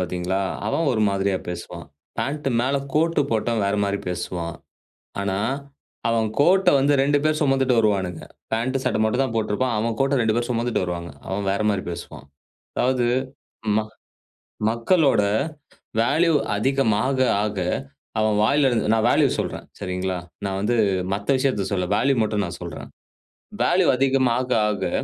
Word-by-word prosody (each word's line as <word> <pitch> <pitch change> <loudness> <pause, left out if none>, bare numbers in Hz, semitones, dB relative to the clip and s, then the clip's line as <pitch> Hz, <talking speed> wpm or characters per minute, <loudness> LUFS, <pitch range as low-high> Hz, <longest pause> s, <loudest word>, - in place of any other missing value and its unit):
பார்த்தீங்களா, 90 +1 -1 0.3
அவன் 160 +7 +1
ஒரு 110 - 0
மாதிரியா 100 -1 0
பேசுவான். 85 0 -7 0.3
பாண்ட் 140 +6 -2
மேல 135 +3 +1 0.2
கோட்டு 165 +1 +2
போட்டவன் 115 -1 0
வேற 100 - 0
மாரி 100 0 -1
பேசுவான். 85 -1 -4 0.7
ஆனா, 95 -1 -1 0.7
அவன் 115 -1 +1
கோட்ட 185 +5 +5
வந்து 140 +2 +3
2 145 +2 +3
பேர் 155 0 +1
சுமந்துட்டு 135 -2 +2
வருவானுங்க. 95 -5 0 0.3
பாண்ட்டு. 130 +4 0
சட்ட - - 0
மட்டும் 125 +5 +2
தான் 130 - -3
போட்ருப்பான். 110 +3 0
அவன் 115 +1 -1
கோட்ட 135 0 +2
2 110 -1 +2
பேரும் 120 +1 -1
சுமந்துட்டு 120 -3 0
வருவாங்க. 85 -1 -4 0.2
அவன் 95 +1 -2
வேற 100 - -1
மாரி 100 -2 -1
பேசுவான். 85 - -9 0.5
அதாவது. 125 -1 +1 0.7
ம 110 - +3 0.9
மக்களோட 130 - +3 0.8
வேல்யூ 160 +8 +3 0.2
அதிகமா 115 -2 +1 0.4
ஆக. 105 -2 -3 0.6
அவன் 110 -1 +2
வாயில 140 +4 +3
இருந்து 115 -4 0
நான் 110 0 +2
வேல்யூ - - +4
சொல்றேன். - - -4
சரிங்களா? 90 -1 -2 0.3
நான் 95 -1 -2
வந்து 120 +4 +1 0.4
மத்த 100 +4 -5
விஷயத்த 130 -8 0
சொல்ல. 90 -3 0
வேல்யூ 135 +6 +2
மட்டும் 105 -1 0
நான் 85 - -6
சொல்றன். 85 -2 -7 0.7
வேல்யூ - - +3
அதிகமா 130 -2 +2
ஆக, 105 -5 0
110 Hz, 145 wpm, -23 LUFS, 100-135 Hz, 0.9 s, கோட்ட